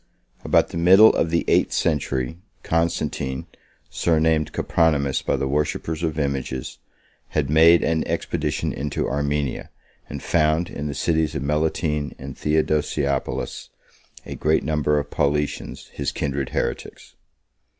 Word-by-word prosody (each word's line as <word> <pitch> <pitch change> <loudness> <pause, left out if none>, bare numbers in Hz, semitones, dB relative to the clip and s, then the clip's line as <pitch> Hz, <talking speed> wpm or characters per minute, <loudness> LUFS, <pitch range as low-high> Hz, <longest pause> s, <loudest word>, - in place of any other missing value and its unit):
About - - +3
the - - -6
middle 95 +6 +7
of 80 - +1
the 85 0 0
eight - - +3
century, 70 -1 -1 0.2
Constantine, 75 -5 -1 0.5
surnamed 80 -2 +1
Copronymus 75 -5 +1
by - - 0
the 70 - -1
worshippers 75 +3 -2
of 80 -2 -2
images, 70 -3 -3 0.5
had 75 -2 -1
made 80 +2 +6
an 80 0 +1
expedition - - -2
into 70 +1 -2
Armenia, 70 0 -2 0.4
and 70 -1 -7
found, 80 +1 +1
in 75 - -4
the 70 - -4
cities 80 0 0
of 70 - -2
Melitene 75 0 -1
and - - -8
Theodosiopolis, 75 -2 -1 0.6
a - - -6
great 80 +1 +1
number 75 0 +1
of 75 0 -3
Paulicians, 75 -1 -2
his 70 - -3
kindred 70 -2 -2
heretics. - - -4
75 Hz, 130 wpm, -23 LUFS, 70-80 Hz, 0.6 s, middle